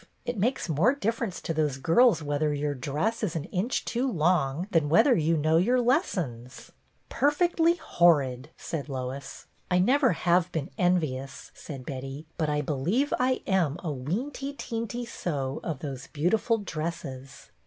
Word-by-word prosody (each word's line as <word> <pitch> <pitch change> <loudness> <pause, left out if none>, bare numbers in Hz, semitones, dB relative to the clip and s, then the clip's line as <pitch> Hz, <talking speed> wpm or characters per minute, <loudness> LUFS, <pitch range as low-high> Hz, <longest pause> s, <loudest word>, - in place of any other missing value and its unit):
It 245 - -2
makes 235 +5 0
more 175 - +3
difference 230 -6 -2
to 165 - -2
those 150 -4 0
girls 165 - +4
whether 145 +1 0
your 145 0 -1
dress 150 - -2
is 195 -7 -2
an 160 - -2
inch 195 - -2
too 250 +2 -1
long 165 - +1
than 160 -5 +2
whether 210 - +5
you 165 0 +2
know 155 +2 +3
your 240 +9 +3
lessons." 180 - -1 0.2
" - - -42
Perfectly 335 +3 +2
horrid," 145 - +2
said 150 -3 -5
Lois. 135 +1 -6
" - - -38
I 180 - +3
never 255 +6 +4
have 175 +1 +2
been 150 -4 -3
envious," 145 -7 -1
said 135 -4 -9
Betty, 135 +3 -6
"but 155 -2 -1
I 150 0 +1
believe 165 - 0
I 255 +1 +1
am 175 -6 +1
a 165 - -2
weenty 260 - -4
teenty 230 +1 -4
so 140 - -3
of 155 -6 -4
those 135 -3 -6
beautiful 205 +9 +1
dresses. 155 -8 -6
165 Hz, 160 wpm, -27 LUFS, 145-230 Hz, 0.2 s, whether